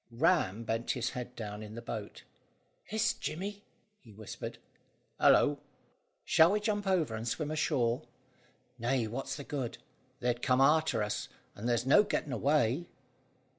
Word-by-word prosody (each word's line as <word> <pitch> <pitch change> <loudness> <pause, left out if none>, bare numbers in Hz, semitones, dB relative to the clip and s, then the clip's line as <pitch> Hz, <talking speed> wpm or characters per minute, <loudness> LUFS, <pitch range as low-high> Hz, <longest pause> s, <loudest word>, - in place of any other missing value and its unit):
Ram 115 - +2
bent 115 +1 -2
his 120 -2 -2
head 125 0 -6
down 105 -2 -6
in 110 0 -8
the - - -5
boat. 110 -3 -6 0.6
"Hist, 220 +2 0
Jemmy!" 200 +5 -4 0.4
he 115 - -17
whispered. 105 0 -7 0.6
"Hallo!" 145 -1 +5 0.7
"Shall 165 +4 +6
we 210 - +2
jump 205 -1 -1
over 170 -11 +2
and 110 +1 -4
swim 150 +5 -2
ashore?" 130 -6 0 0.7
"Nay; 120 0 +1
what's 120 +5 -4
the 145 - -6
good? 135 -5 -4 0.4
they'd 120 0 0
come 125 -1 +3
arter 140 -5 +4
us, 105 - -3 0.2
and 115 +4 -4
there's 120 0 +1
no 140 +10 +7
getting 155 -8 -2
away." 140 +4 +2
125 Hz, 145 wpm, -32 LUFS, 115-155 Hz, 0.7 s, no